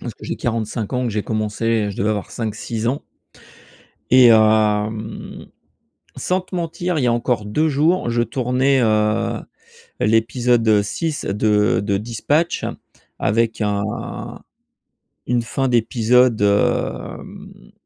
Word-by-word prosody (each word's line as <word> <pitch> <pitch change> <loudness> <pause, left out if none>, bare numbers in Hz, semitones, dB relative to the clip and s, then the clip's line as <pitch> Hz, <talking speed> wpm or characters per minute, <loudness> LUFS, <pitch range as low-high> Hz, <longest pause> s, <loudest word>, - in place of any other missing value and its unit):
Parce - - -6
que - - -13
j'ai - - -4
45 110 -1 -3
ans 125 0 0
et - - 0
que - - -1
j'ai 105 - -1
commencé, 110 0 -1
je 100 - -8
devais 105 +2 0
avoir 105 -2 -3
5-6 110 0 -4
ans. 140 +4 -2 1.1
Et, 130 -1 +8
hem, 110 0 +1 0.7
sans 185 +1 -1
te 185 0 -9
mentir, 175 0 -2
il 140 - 0
y - - +2
a 120 - +3
encore 120 -2 -1
2 150 +10 +1
jours, 155 +2 +1
je 120 0 +1
tournais, 130 +1 +1
heu, 110 +1 +1 0.6
l'épisode 115 0 +2
6 155 +9 -3
de 105 +1 +2
de 100 -1 0
Dispatch 120 +10 -1 0.5
avec 115 +2 0
un 105 0 -3 0.9
une 120 -1 +1
fin 135 +3 -2
d'épisode, 120 0 +3
hem, 100 0 -2
115 Hz, 130 wpm, -20 LUFS, 105-125 Hz, 1.1 s, Et